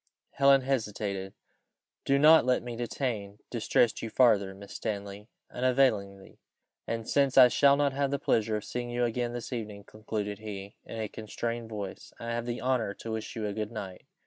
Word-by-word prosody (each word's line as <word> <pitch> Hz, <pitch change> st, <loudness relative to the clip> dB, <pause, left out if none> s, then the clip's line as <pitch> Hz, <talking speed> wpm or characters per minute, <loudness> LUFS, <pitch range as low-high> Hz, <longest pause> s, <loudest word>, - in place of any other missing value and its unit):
Helen 140 Hz, -1 st, +5 dB
hesitated. 105 Hz, -7 st, -2 dB, 0.7 s
"Do 140 Hz, -, +3 dB
not 155 Hz, +3 st, +7 dB
let 125 Hz, -1 st, +1 dB
me 120 Hz, -1 st, -6 dB
detain 115 Hz, -4 st, -3 dB
distress 115 Hz, 0 st, +2 dB
you 115 Hz, -, -4 dB
farther, 105 Hz, -6 st, +3 dB
Miss 100 Hz, 0 st, -11 dB
Stanley, 100 Hz, 0 st, -5 dB, 0.2 s
unavailingly; 120 Hz, -7 st, 0 dB, 0.5 s
and 115 Hz, -1 st, -3 dB
since 140 Hz, -2 st, +2 dB
I 125 Hz, -2 st, +10 dB
shall 140 Hz, +2 st, +5 dB
not 140 Hz, -1 st, +2 dB
have 140 Hz, 0 st, 0 dB
the 140 Hz, -, 0 dB
pleasure 110 Hz, -5 st, +1 dB
of 105 Hz, -, -6 dB
seeing 120 Hz, 0 st, -4 dB
you 120 Hz, 0 st, 0 dB
again 120 Hz, 0 st, -2 dB
this 120 Hz, +1 st, -5 dB
evening," 105 Hz, -4 st, -5 dB
concluded 105 Hz, -1 st, -5 dB
he, 100 Hz, -2 st, -7 dB
in 115 Hz, -, -7 dB
a 110 Hz, -, -2 dB
constrained 115 Hz, +2 st, -5 dB
voice, 100 Hz, -3 st, -7 dB
"I 115 Hz, -, -5 dB
have 120 Hz, 0 st, -3 dB
the 120 Hz, 0 st, -3 dB
honour 125 Hz, -6 st, 0 dB
to 115 Hz, -, -7 dB
wish 110 Hz, -1 st, -5 dB
you 110 Hz, -2 st, -3 dB
a 105 Hz, -, -2 dB
good 105 Hz, +1 st, -4 dB
night." 95 Hz, -5 st, -7 dB
115 Hz, 180 wpm, -29 LUFS, 105-125 Hz, 0.7 s, I